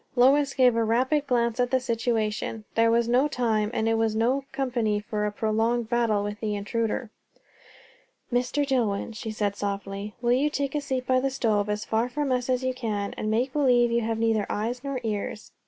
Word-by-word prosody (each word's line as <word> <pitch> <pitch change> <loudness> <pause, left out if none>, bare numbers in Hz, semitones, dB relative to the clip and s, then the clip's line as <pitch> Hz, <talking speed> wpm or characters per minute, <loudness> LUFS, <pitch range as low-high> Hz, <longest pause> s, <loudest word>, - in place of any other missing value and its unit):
Lois 270 +3 +4
gave 250 -3 +5
a 230 - +2
rapid 260 +6 +1
glance 235 -2 +1
at 245 0 +2
the 260 - +2
situation. 225 -3 -1
There 230 0 +3
was 230 0 +2
no 250 +4 +3
time, 225 -6 0
and 225 -2 -1
it 225 0 +2
was 225 -1 +1
no 255 +5 +1
company 235 -6 0
for 210 0 -2
a - - -2
prolonged 225 +2 0
battle 230 -4 +1
with 205 +1 -4
the 210 -2 -2
intruder. 225 +2 -2 1.2
"Mr. 250 +4 +1
Dillwyn," 230 -6 0
she 220 +1 -6
said 205 -2 -1
softly, 200 0 -4
"will 240 0 +1
you 270 +4 +3
take 280 -2 -2
a 295 - -1
seat 260 -2 -3
by 255 0 +3
the 270 +1 0
stove, 215 -6 0
as 210 0 -2
far 225 +2 0
from 285 +1 -2
us 250 0 0
as 255 0 +1
you 255 0 0
can; 215 -5 -3
and 215 - -3
make 245 +4 0
believe 245 -5 +3
you 235 0 +2
have 225 0 -1
neither 225 -2 +1
eyes 235 +4 -2
nor 275 -2 -3
ears? 215 -1 -4
235 Hz, 205 wpm, -26 LUFS, 215-255 Hz, 1.2 s, gave